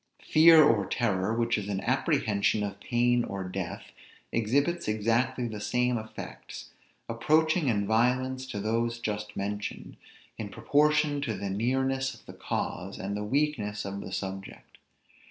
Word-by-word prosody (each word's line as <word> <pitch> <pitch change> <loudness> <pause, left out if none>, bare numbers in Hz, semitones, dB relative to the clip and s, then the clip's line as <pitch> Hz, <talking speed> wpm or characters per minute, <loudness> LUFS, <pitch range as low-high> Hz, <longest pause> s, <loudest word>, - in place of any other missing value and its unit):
Fear 160 0 +7
or 110 -9 +3
terror, 105 -4 0
which 115 0 +1
is 100 0 -6
an 100 -2 -1
apprehension 105 0 +1
of 100 -1 -5
pain 120 +1 +2
or 100 -3 -4
death, 90 -2 -5 0.4
exhibits 140 +10 +1
exactly 120 +4 +1
the 110 -2 -6
same 125 +2 +1
effects, 110 0 -9 0.4
approaching 155 +7 +2
in 105 -4 +1
violence 130 +4 +1
to 105 -6 -5
those 115 +3 0
just 105 -2 -4
mentioned, 100 +1 -4 0.4
in 105 -2 -4
proportion 150 +3 +2
to 115 -6 -2
the 100 0 -3
nearness 130 +5 0
of - - -19
the - - -10
cause, 95 +3 -4
and 100 +1 -4
the 105 - -3
weakness 105 -5 -1
of 100 0 -5
the - - -8
subject. 95 +1 -7
115 Hz, 145 wpm, -28 LUFS, 100-130 Hz, 0.4 s, Fear